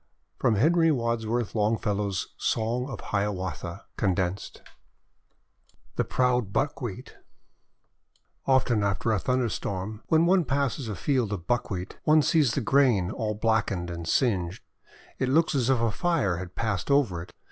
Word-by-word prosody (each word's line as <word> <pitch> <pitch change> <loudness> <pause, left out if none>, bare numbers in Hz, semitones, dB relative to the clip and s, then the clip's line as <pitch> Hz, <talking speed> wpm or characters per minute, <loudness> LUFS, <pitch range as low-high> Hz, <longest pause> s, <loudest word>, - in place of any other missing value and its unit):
" - - -46
From 110 - +2
HENRY 165 - +4
WADSWORTH 115 -4 -1
LONGFELLOW'S 105 -3 -1
Song 120 +4 -1
of 120 -7 -6
Hiawatha 95 -2 -3
(condensed} 95 -2 -1 1.3
THE - - +1
PROUD 125 -5 +1
BUCKWHEAT 125 -5 -3 1.3
OFTEN 125 -5 +3
after 100 +3 0
a 105 - +2
thunderstorm, 110 -4 -2
when 160 +1 +4
one 180 0 +4
passes 135 -4 -1
a 105 - -3
field 125 - 0
of 90 -5 -4
Buckwheat, 100 -6 -2
one 155 0 +5
sees 145 -4 +3
the 140 - 0
grain 115 -7 +3
all 110 -1 -2
black 110 0 +1
ened 90 -2 -3
and 85 -1 -6
singed. 95 -6 0 0.6
It 130 - 0
looks 160 +5 +3
as 130 -3 +1
if 130 -3 +3
a 115 -1 +1
fire 160 - 0
had 90 0 -7
passed 105 -3 -2
over 125 -12 +2
it. 85 - -11
110 Hz, 145 wpm, -27 LUFS, 100-130 Hz, 1.3 s, one